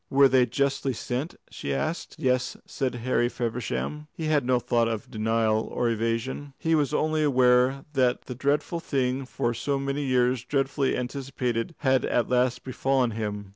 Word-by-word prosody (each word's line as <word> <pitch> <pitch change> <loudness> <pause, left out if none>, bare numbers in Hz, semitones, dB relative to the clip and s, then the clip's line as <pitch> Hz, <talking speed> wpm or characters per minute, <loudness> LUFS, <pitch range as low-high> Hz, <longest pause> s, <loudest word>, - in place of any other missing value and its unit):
"Were 140 0 +6
they 130 -1 +4
justly 135 +1 0
sent?" 130 +8 -3 0.2
she - - -5
asked. 155 +2 -2
"Yes," 125 -4 0
said 130 -2 -2
Harry 120 0 +1
Feversham. 125 +6 -3
He 160 - -4
had 155 -3 +2
no 130 -1 +4
thought 120 -1 +1
of 115 +3 -4
denial 110 -1 +1
or 120 -1 0
evasion. 115 +5 -2
He 165 - 0
was 150 -3 +2
only 155 +1 +1
aware 130 -1 +3
that 130 -3 +2
the 125 - -6
dreadful 145 +6 0
thing 130 -4 -1
for 120 -2 -1
so 140 +4 -1
many 140 +1 -2
years 125 -2 +2
dreadfully 135 +1 0
anticipated 125 0 -3
had 130 -3 +3
at 120 - +1
last 125 0 +1
befallen 130 -1 +1
him. 105 -2 -4
130 Hz, 165 wpm, -26 LUFS, 120-140 Hz, 0.2 s, Were